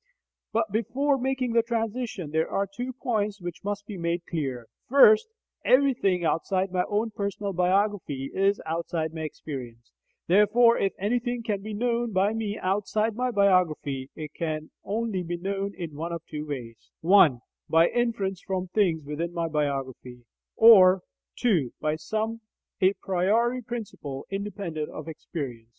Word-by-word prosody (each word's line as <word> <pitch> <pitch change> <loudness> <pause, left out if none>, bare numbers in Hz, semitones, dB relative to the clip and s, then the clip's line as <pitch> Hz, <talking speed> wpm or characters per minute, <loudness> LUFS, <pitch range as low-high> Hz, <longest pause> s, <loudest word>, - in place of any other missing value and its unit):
But 220 -2 0
before 270 +6 +1
making 255 -2 -1
the 230 - +5
transition, 225 -6 -3
there 160 +1 +1
are 200 - 0
two 245 +6 -5
points 215 -5 -2
which 175 -2 -7
must 205 0 -3
be 205 -3 -7
made 170 0 -2
clear. 135 -8 -3 0.2
First: 225 - +7 0.4
Everything 245 -10 +3
outside 185 +4 0
my 180 -1 +1
own 215 +2 0
personal 200 -1 -3
biography 180 -6 0
is 195 +1 +2
outside 160 0 -2
my 160 - -5
experience; 125 -7 -7 0.3
therefore 210 +5 +5
if 195 - +1
anything 240 +4 -1
can 210 -4 -2
be 215 +1 -6
known 235 0 0
by 195 +3 +2
me 215 -2 -3
outside 210 +3 0
my 250 +2 0
biography, 175 - +1
it 155 -1 -7
can 155 -2 -4
only 215 -2 -2
be 175 0 -4
known 195 +2 -3
in 165 -5 -6
one 165 +3 -4
of 170 -1 -5
two 150 0 -6
ways: 120 -6 -7
(1) 165 -7 +6 0.3
By 165 +1 +5
inference 215 -6 -1
from 185 -1 -3
things 180 -6 +1
within 155 +4 -3
my 170 -1 0
biography, 135 -5 -3 0.3
or 190 -5 +8 0.3
(2) 180 - +1
By 155 0 0
some 220 +6 -3 0.4
a 190 +1 +5
priori 215 +8 +1
principle 205 - -6
independent 195 -6 -4
of 155 - -8
experience. 135 -8 -6
195 Hz, 150 wpm, -26 LUFS, 160-220 Hz, 0.4 s, or